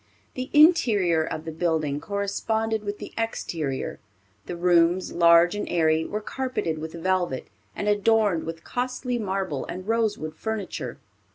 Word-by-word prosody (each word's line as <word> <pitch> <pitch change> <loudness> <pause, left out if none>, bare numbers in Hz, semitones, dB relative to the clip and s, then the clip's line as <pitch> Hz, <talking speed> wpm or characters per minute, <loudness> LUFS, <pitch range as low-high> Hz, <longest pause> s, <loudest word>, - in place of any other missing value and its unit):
The 255 +1 -5
interior 220 - +5
of 155 0 -5
the 160 - -4
building 155 -3 0
corresponded 220 +3 -1
with 205 0 -4
the - - -9
exterior. 160 -11 -3 0.5
The 175 - -4
rooms, 175 +1 +3
large 170 0 +6
and 205 - -4
airy, 160 -1 +2
were 210 - -3
carpeted 230 -10 -3
with 160 +1 -6
velvet, 175 -5 -1 0.3
and 205 - -3
adorned 205 -4 +2
with 165 0 -6
costly 250 0 -2
marble 190 - -2
and 185 +2 -7
rosewood 215 -9 0
furniture. 220 +2 -4
185 Hz, 135 wpm, -25 LUFS, 165-220 Hz, 0.5 s, large